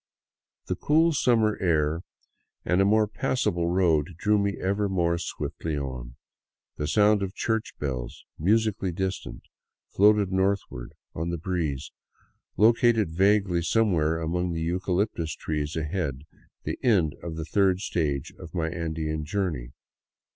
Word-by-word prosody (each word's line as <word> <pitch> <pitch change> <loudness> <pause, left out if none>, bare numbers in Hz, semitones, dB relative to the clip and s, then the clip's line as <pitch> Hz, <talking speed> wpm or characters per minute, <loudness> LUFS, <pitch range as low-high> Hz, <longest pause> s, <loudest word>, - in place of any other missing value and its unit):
The - - -2
cool 160 +2 +3
summer 115 -6 +2
air 80 -2 +1 0.6
and 90 +2 +3
a - - +4
more 110 +2 +4
passable 95 -6 -1
road 85 -3 +2
drew 105 +3 +2
me 100 0 0
ever 100 +2 0
more 85 -2 +1
swiftly 80 -2 -4
on; 65 -3 -5 0.6
the 75 - -3
sound 105 +4 +4
of 95 -1 -3
church 110 -1 -1
bells, 65 -4 -5
musically 105 +1 +1
distant, 95 +2 -4 0.5
floating 105 -1 +3
northward 95 -10 -1 0.2
on 80 +2 -3
the 85 - -2
breeze, 80 -5 -3 0.7
located 115 -3 +4
vaguely 95 0 +2
somewhere 85 -5 +2
among 85 +2 -1
the 80 - -3
eucalyptus 90 -1 -1
trees 75 -1 -3
ahead 75 -4 -2 0.4
the - - -4
end 95 - +3
of 85 -2 -6
the 80 -1 -4
third 95 +2 +2
stage 75 -8 -2
of 85 - -10
my 80 -2 0
Andean 80 -2 -3
journey. 75 -8 -2
90 Hz, 135 wpm, -26 LUFS, 80-100 Hz, 0.7 s, a